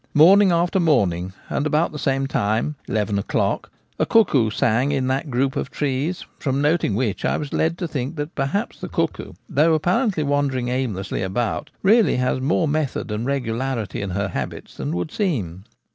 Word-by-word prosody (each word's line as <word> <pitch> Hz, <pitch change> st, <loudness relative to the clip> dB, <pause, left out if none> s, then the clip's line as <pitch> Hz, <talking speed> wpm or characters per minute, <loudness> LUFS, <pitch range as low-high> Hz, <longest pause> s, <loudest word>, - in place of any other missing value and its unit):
Morning 190 Hz, +6 st, +7 dB
after 175 Hz, +2 st, +2 dB
morning, 95 Hz, -, +2 dB, 0.2 s
and 145 Hz, -, -1 dB
about 155 Hz, +3 st, +1 dB
the 150 Hz, -, -7 dB
same 135 Hz, 0 st, 0 dB
time 110 Hz, +2 st, 0 dB
— -, -, -34 dB
eleven 105 Hz, -2 st, 0 dB
o'clock -, -, -1 dB
— -, -, -40 dB
a -, -, +3 dB
cuckoo 145 Hz, -, +4 dB
sang 120 Hz, +5 st, +1 dB
in 135 Hz, -2 st, 0 dB
that 135 Hz, +4 st, -1 dB
group 130 Hz, +1 st, 0 dB
of -, -, -2 dB
trees, 145 Hz, +4 st, -2 dB
from 135 Hz, -1 st, -1 dB
noting 150 Hz, -, +2 dB
which 110 Hz, -3 st, -1 dB
I -, -, +1 dB
was 145 Hz, -2 st, -5 dB
led 165 Hz, +1 st, +1 dB
to 175 Hz, -, -3 dB
think 140 Hz, 0 st, -4 dB
that 150 Hz, +2 st, -4 dB
perhaps 145 Hz, +12 st, -2 dB
the -, -, -6 dB
cuckoo, -, -, -2 dB
though 160 Hz, +3 st, +3 dB
apparently 180 Hz, -, +1 dB
wandering 140 Hz, -3 st, 0 dB
aimlessly 115 Hz, -7 st, -2 dB
about, 100 Hz, +4 st, -2 dB
really 220 Hz, +3 st, +5 dB
has 125 Hz, 0 st, 0 dB
more 155 Hz, +4 st, +1 dB
method 145 Hz, -6 st, -1 dB
and 110 Hz, +4 st, -2 dB
regularity 125 Hz, -5 st, -2 dB
in 100 Hz, -, -3 dB
her 100 Hz, +2 st, -1 dB
habits 70 Hz, -7 st, -5 dB
than 70 Hz, +5 st, -3 dB
would 90 Hz, -2 st, -3 dB
seem. 100 Hz, -, -2 dB
135 Hz, 185 wpm, -22 LUFS, 110-155 Hz, 0.2 s, Morning